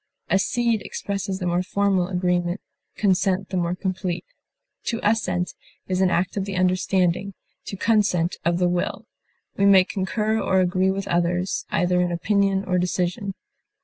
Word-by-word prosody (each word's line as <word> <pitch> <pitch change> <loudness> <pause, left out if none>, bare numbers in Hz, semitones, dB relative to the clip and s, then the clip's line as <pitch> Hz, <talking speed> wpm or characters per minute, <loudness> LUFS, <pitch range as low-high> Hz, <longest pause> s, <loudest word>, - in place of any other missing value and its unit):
Accede 230 +3 +2
expresses 195 -1 -4
the 185 - -4
more 175 0 +1
formal 195 -1 +1
agreement, 180 0 0 0.4
consent 190 -1 +1
the 185 - -2
more 175 0 0
complete. 185 -1 -3 0.6
To 230 - -1
assent 180 -5 0 0.3
is 185 0 0
an 190 - +4
act 180 +1 0
of 195 - 0
the 200 -1 -4
understanding; 185 +1 +1 0.3
to 195 - -6
consent, 190 -6 +2
of 170 0 +1
the 180 0 +2
will. 175 0 -2 0.5
We 200 - +4
may 190 -2 +7
concur 210 +4 -1
or 190 0 +2
agree 185 +1 +2
with 195 0 -2
others, 175 +2 0
either 180 +1 +2
in 175 0 0
opinion 195 +2 +1
or 180 -1 +1
decision. 180 +2 -1
185 Hz, 150 wpm, -23 LUFS, 180-195 Hz, 0.6 s, may